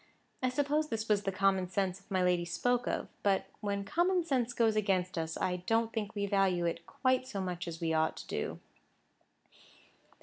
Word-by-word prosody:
I 255 Hz, -, +2 dB
suppose 290 Hz, +4 st, +1 dB
this 225 Hz, 0 st, -2 dB
was 210 Hz, -2 st, +3 dB
the 195 Hz, -, +1 dB
common 190 Hz, -1 st, +2 dB
sense 190 Hz, 0 st, -1 dB
my 185 Hz, -1 st, +1 dB
lady 180 Hz, -1 st, +3 dB
spoke 245 Hz, +8 st, 0 dB
of; -, -, -1 dB
but 195 Hz, -1 st, +2 dB
when 200 Hz, -1 st, -2 dB
common 350 Hz, -, +2 dB
sense 255 Hz, -7 st, 0 dB
goes 225 Hz, -2 st, +2 dB
against 190 Hz, -4 st, +1 dB
us, 160 Hz, -1 st, -2 dB
I 180 Hz, -1 st, 0 dB
don't 225 Hz, 0 st, +2 dB
think 220 Hz, -1 st, -3 dB
we 200 Hz, 0 st, 0 dB
value 195 Hz, -3 st, +2 dB
it 170 Hz, 0 st, -2 dB
quite 255 Hz, -1 st, +1 dB
so 205 Hz, -6 st, -4 dB
much 180 Hz, -2 st, -3 dB
as 165 Hz, -1 st, -5 dB
we 165 Hz, -1 st, 0 dB
ought 160 Hz, 0 st, +1 dB
to -, -, -7 dB
do. -, -, -3 dB
200 Hz, 190 wpm, -32 LUFS, 180-235 Hz, -, was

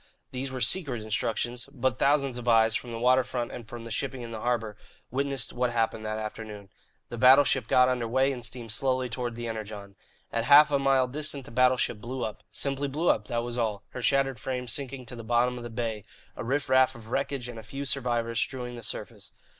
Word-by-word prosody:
These 130 Hz, +1 st, -3 dB
were 130 Hz, -1 st, -5 dB
secret 125 Hz, -, +2 dB
instructions; 115 Hz, +3 st, -1 dB
but 130 Hz, -2 st, -1 dB
thousands 140 Hz, -3 st, +2 dB
of 125 Hz, -, -9 dB
eyes, 115 Hz, -1 st, +5 dB
from 120 Hz, +1 st, -3 dB
the 115 Hz, -, -4 dB
water 130 Hz, +2 st, +4 dB
front 125 Hz, -2 st, -3 dB
and 115 Hz, -3 st, -9 dB
from 120 Hz, 0 st, -7 dB
the 115 Hz, -, -8 dB
shipping 130 Hz, +2 st, -3 dB
in 115 Hz, -, -7 dB
the 110 Hz, -1 st, -6 dB
harbour, 115 Hz, -4 st, -1 dB, 0.4 s
witnessed 135 Hz, -1 st, -1 dB
what 125 Hz, 0 st, +1 dB
happened 115 Hz, -2 st, 0 dB
that 110 Hz, 0 st, -2 dB
afternoon. 105 Hz, -2 st, -7 dB, 0.4 s
The 120 Hz, -, -6 dB
battleship 130 Hz, -1 st, +6 dB
got 125 Hz, +1 st, +5 dB
under 125 Hz, -2 st, 0 dB
way 130 Hz, +4 st, +2 dB
and 125 Hz, -3 st, -6 dB
steamed 115 Hz, 0 st, -4 dB
slowly 130 Hz, +1 st, 0 dB
toward 120 Hz, 0 st, -3 dB
the 120 Hz, 0 st, -5 dB
Energon. 105 Hz, -3 st, -6 dB, 0.4 s
At 115 Hz, 0 st, -1 dB
half 150 Hz, +1 st, +8 dB
a 140 Hz, -, +3 dB
mile 135 Hz, -2 st, +3 dB
distant 145 Hz, 0 st, -5 dB
the -, -, -11 dB
battleship 125 Hz, -3 st, +2 dB
blew 125 Hz, +1 st, -3 dB
up 110 Hz, -, -6 dB
simply 140 Hz, 0 st, -2 dB
blew 155 Hz, +5 st, 0 dB
up, 105 Hz, -1 st, +2 dB
that 120 Hz, 0 st, -1 dB
was 120 Hz, 0 st, -4 dB
all, 105 Hz, -3 st, -1 dB
her 125 Hz, -, -7 dB
shattered 135 Hz, -1 st, +2 dB
frame 125 Hz, +1 st, -3 dB
sinking 130 Hz, +1 st, -4 dB
to 120 Hz, -, -9 dB
the 115 Hz, -, -8 dB
bottom 120 Hz, +2 st, +2 dB
of 120 Hz, -, -7 dB
the 120 Hz, -, -6 dB
bay, 115 Hz, -2 st, -3 dB, 0.3 s
a -, -, -5 dB
riff 135 Hz, +4 st, -1 dB
raff 130 Hz, 0 st, +4 dB
of 115 Hz, -1 st, -12 dB
wreckage 130 Hz, -1 st, -1 dB
and 120 Hz, -2 st, -7 dB
a -, -, -7 dB
few 135 Hz, +6 st, -6 dB
survivors 120 Hz, -3 st, 0 dB
strewing 125 Hz, -2 st, -3 dB
the 120 Hz, -, -8 dB
surface. 110 Hz, -, -5 dB
125 Hz, 220 wpm, -28 LUFS, 115-130 Hz, 0.4 s, half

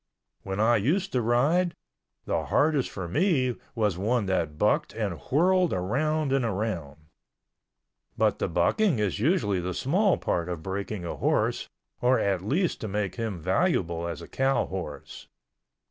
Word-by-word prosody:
When 95 Hz, 0 st, -4 dB
I 115 Hz, +2 st, +4 dB
used 175 Hz, -, 0 dB
to 125 Hz, -, +1 dB
ride, 145 Hz, +10 st, +2 dB, 0.5 s
the -, -, -1 dB
hardest 150 Hz, -3 st, +2 dB
for 95 Hz, -3 st, -5 dB
me 130 Hz, -, +1 dB, 0.2 s
was 105 Hz, -6 st, 0 dB
one 115 Hz, +2 st, +1 dB
that 85 Hz, -5 st, -1 dB
bucked -, -, +1 dB
and -, -, -2 dB
whirled 180 Hz, +4 st, +3 dB
around 140 Hz, +10 st, 0 dB
and 135 Hz, -2 st, +2 dB
around. 95 Hz, -10 st, -3 dB, 1.2 s
But -, -, +2 dB
the -, -, 0 dB
bucking 120 Hz, -, +2 dB
is 105 Hz, -2 st, -1 dB
usually 120 Hz, -, +1 dB
the 90 Hz, 0 st, -3 dB
small 180 Hz, -, +2 dB
part 85 Hz, 0 st, -1 dB
of 85 Hz, -3 st, -5 dB
breaking 95 Hz, 0 st, -4 dB
a 85 Hz, -, -4 dB
horse -, -, 0 dB, 0.3 s
or 125 Hz, +1 st, +4 dB
at 95 Hz, -3 st, 0 dB
least 155 Hz, -, 0 dB
to 110 Hz, -, -3 dB
make 100 Hz, -2 st, -2 dB
him 110 Hz, -5 st, -3 dB
valuable 85 Hz, +1 st, 0 dB
as 85 Hz, -3 st, -5 dB
a -, -, -10 dB
cow 135 Hz, +1 st, +1 dB
horse. 90 Hz, -6 st, -7 dB
110 Hz, 155 wpm, -27 LUFS, 95-145 Hz, 1.2 s, I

